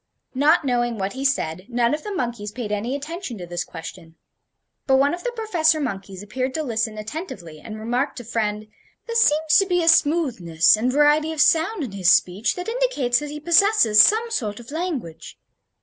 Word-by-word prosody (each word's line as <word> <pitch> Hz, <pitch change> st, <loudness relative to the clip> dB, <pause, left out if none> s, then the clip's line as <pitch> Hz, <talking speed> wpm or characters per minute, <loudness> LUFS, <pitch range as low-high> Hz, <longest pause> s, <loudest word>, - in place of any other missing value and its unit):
Not 295 Hz, +4 st, +3 dB
knowing 240 Hz, -2 st, 0 dB
what 195 Hz, 0 st, -3 dB
he 265 Hz, +1 st, -6 dB
said, 185 Hz, -9 st, -1 dB
none 235 Hz, +1 st, +1 dB
of 300 Hz, -, -2 dB
the 420 Hz, -, -7 dB
monkeys 235 Hz, -, -4 dB
paid 225 Hz, -2 st, -6 dB
any 220 Hz, +6 st, -2 dB
attention 300 Hz, -, -6 dB
to 180 Hz, -, -7 dB
this 175 Hz, 0 st, -4 dB
question. 165 Hz, 0 st, -10 dB, 0.7 s
But 265 Hz, -, +4 dB
one 280 Hz, +3 st, +2 dB
of 350 Hz, -, -6 dB
the -, -, -2 dB
professor 335 Hz, -9 st, +1 dB
monkeys 195 Hz, -7 st, -5 dB
appeared 255 Hz, +5 st, -4 dB
to 315 Hz, -, -2 dB
listen 225 Hz, -4 st, -2 dB
attentively, 210 Hz, -, -8 dB
and 215 Hz, +5 st, -9 dB
remarked 245 Hz, +6 st, -2 dB
to 240 Hz, -, -7 dB
friend: 215 Hz, -2 st, -3 dB, 0.4 s
"There 465 Hz, -, -6 dB
seems 315 Hz, -8 st, +4 dB
to 390 Hz, -, +1 dB
be 355 Hz, -2 st, +1 dB
a -, -, -2 dB
smoothness 280 Hz, -, +3 dB
and 235 Hz, +4 st, -1 dB
variety 295 Hz, +3 st, +3 dB
of 315 Hz, -, -8 dB
sound 325 Hz, +5 st, +2 dB
in 245 Hz, -, -6 dB
his 190 Hz, -3 st, +2 dB
speech 190 Hz, +5 st, +2 dB
that 360 Hz, +2 st, -6 dB
indicates 455 Hz, -, 0 dB
that 295 Hz, 0 st, -6 dB
he 300 Hz, +1 st, -7 dB
possesses 340 Hz, -, +5 dB
some 450 Hz, -, +3 dB
sort 215 Hz, -, -3 dB
of 240 Hz, +2 st, -12 dB
language. 280 Hz, -, -5 dB
255 Hz, 195 wpm, -22 LUFS, 210-320 Hz, 0.7 s, possesses